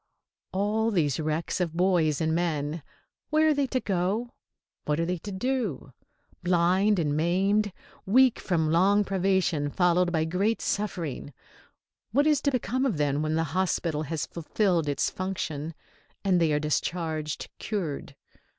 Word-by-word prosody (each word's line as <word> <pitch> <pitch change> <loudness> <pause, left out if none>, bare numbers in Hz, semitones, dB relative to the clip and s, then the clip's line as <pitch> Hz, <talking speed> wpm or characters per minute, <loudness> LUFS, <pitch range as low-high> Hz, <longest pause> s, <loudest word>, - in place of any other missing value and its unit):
All 210 +4 +1
these 160 - +1
wrecks 155 +4 -1
of 170 -3 -1
boys 175 -5 +2
and 160 0 +1
men, 160 -2 -1 0.5
where 315 0 +4
are - - +4
they 285 -2 0
to 255 0 0
go? 200 +5 -1 0.5
What 150 +1 0
are 165 - +1
they 180 0 -2
to 205 - -7
do? 200 - -2 0.5
Blind 180 +4 +3
and 150 -4 0
maimed, 195 +6 +2 0.4
weak 255 +4 +5
from 160 -4 0
long 195 +5 +4
privation 190 -6 +1
followed 180 +2 +2
by 160 -2 +1
great 195 +7 0
suffering, 170 -9 -3 0.8
what 285 +4 +4
is 300 -2 +3
to 285 - +2
become 255 0 -1
of 245 - 0
them 145 0 +1
when 155 0 0
the 165 - +1
hospital 170 -4 0
has 155 0 -3
fulfilled 170 -1 0
its 145 - 0
function 165 -5 -4 0.5
and 180 -3 +3
they 160 -2 +3
are 150 - +2
discharged 155 0 -2
"cured"? 180 -10 -4
175 Hz, 150 wpm, -27 LUFS, 155-205 Hz, 0.8 s, weak